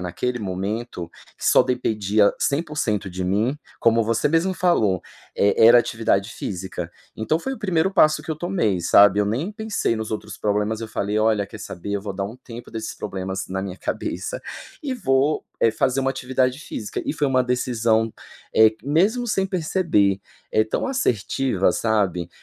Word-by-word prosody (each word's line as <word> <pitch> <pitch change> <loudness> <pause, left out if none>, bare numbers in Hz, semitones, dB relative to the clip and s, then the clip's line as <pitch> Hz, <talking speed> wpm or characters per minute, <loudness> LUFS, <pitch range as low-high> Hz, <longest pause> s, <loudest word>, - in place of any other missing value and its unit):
naquele 120 +8 -2
momento, 95 -2 -4 0.3
que - - -9
só - - +6
dependia 105 -4 +1
100% 140 - -1
de 90 +1 -4
mim, 110 +10 0 0.2
como 115 0 +4
você 115 +5 +1
mesmo 165 +5 +1
falou, 110 - +2 0.3
e 100 - +3
era 115 +2 +8
atividade 115 -4 0
física. 90 -2 -5 0.3
Então 110 +8 0
foi 265 +10 -4
o 265 - -6
1º 185 -2 +1
passo 155 -5 +4
que 160 - -7
eu 155 - -2
tomei, 165 - 0
sabe. 100 +3 +6
Eu 105 - +1
nem 130 - -1
pensei 215 - -1
nos 110 0 -4
outros 105 -1 -6
problemas, 105 +1 0
eu 115 - -4
falei: 105 0 -1
"Olha 110 -1 +2
quer 105 +2 -10
saber, 95 +3 -6
eu 100 - -1
vou 100 -1 -4
dar 100 +1 -2
um 110 +5 -7
tempo 120 -1 -11
desses 110 -1 -5
problemas 95 -1 -4
na 95 +1 -3
minha 95 -2 -5
cabeça, - - -4 0.4
e 275 -3 -2
vou, 140 - +1 0.2
eh, 115 - +4
fazer 130 +4 +1
uma 135 0 +1
atividade 130 0 0
física". 105 -7 -5
E - - -1
foi 150 -1 0
uma 130 -2 +3
decisão, 115 -3 +1 0.4
eh, 110 0 +7
mesmo 195 - +2
sem 195 -4 +1
perceber, 160 - +1 0.3
eh, 110 - +4
tão 110 - -2
assertiva 135 - +1
sabe. 100 -6 0
115 Hz, 175 wpm, -23 LUFS, 100-150 Hz, 0.4 s, era